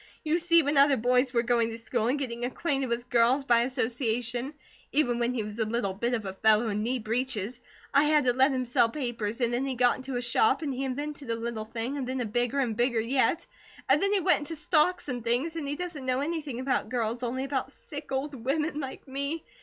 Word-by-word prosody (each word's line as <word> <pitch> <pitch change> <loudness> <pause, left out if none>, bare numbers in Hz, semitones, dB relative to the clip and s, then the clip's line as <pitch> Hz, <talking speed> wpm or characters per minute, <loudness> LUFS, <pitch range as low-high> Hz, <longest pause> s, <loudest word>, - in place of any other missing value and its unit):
You 320 +2 +1
see 335 -1 +4
when 290 +1 0
other 280 -1 +6
boys 250 +2 +2
were 235 -2 +2
going 235 -1 +2
to 225 - -6
school 230 0 -1
and 260 +4 +1
getting 240 -4 -4
acquainted 270 +1 -1
with 240 +1 -3
girls 245 +3 +4
by 235 -3 +5
association, 245 +1 -1 0.4
even 245 -5 +2
when 240 +1 0
he 225 - -1
was 210 +2 -7
a - - +3
little 215 -3 -1
bit 235 +5 -1
of 220 -3 -4
a 190 - -4
fellow 220 +3 +3
in 210 0 -1
knee 245 +4 0
breeches, 235 0 -2 0.3
I 285 +2 +5
had 300 -2 +3
to 245 - +3
let 260 +3 +4
him 255 -1 -1
sell 235 -1 +3
papers, 230 -4 -3
and 240 0 +2
then 245 +2 0
he 265 - -2
got 245 0 +3
into 260 -1 -5
a - - -2
shop, 240 +4 +2
and 285 -3 -2
he 265 +2 -2
invented 285 0 -5
a 230 - +1
little 230 -1 -4
thing, 235 +5 -4
and 265 -3 -3
then 260 0 -2
a 245 - -1
bigger, 240 +4 0
and 245 -5 0
bigger 240 0 +2
yet, 260 +8 +1 0.4
and - - +4
then 395 0 +2
he 405 -2 +2
went 360 +1 +3
into 305 +2 -5
stocks 320 +2 +1
and 245 -4 -4
things, 250 +8 0
and 310 -4 -4
he 285 - -2
doesn't 320 -5 -6
know 255 +1 +1
anything 295 -5 -3
about 260 -1 -1
girls, 235 -1 -1
only 255 +2 -2
about 270 -1 -2
sick 290 0 -9
old 270 +2 -2
women 290 +5 -1
like 270 0 -7
me. 280 +4 -3
255 Hz, 240 wpm, -28 LUFS, 235-280 Hz, 0.4 s, other